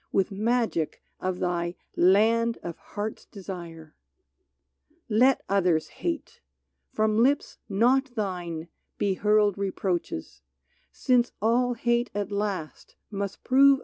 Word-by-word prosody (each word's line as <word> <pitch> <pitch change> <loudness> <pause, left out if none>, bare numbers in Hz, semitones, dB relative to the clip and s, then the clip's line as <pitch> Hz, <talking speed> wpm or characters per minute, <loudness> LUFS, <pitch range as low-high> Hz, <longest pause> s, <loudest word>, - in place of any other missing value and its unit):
With 195 +1 +1
magic 220 -5 0 0.2
of 185 -1 -2
thy 175 -1 -1
" - - -53
Land 225 +5 +4
of 170 -1 -5
Heart's 210 +1 -6
Desire! 170 -5 -9 0.6
" - - -54 0.2
Let 250 +5 +4
others 180 -5 +2
hate! 335 -3 -4 0.2
— - - -53
from 215 0 +2
lips 280 +4 +1
not 245 +6 +2
thine 175 -6 -3 0.3
be 200 -1 +1
hurled 210 0 +2
Reproaches; 180 - -3 0.5
since 245 -2 +2
all 245 +3 +2
hate 240 +1 +1
at 205 -1 -2
last 200 -6 -4 0.2
must 200 -1 -4
prove. 275 +1 +6
205 Hz, 120 wpm, -27 LUFS, 180-235 Hz, 0.6 s, prove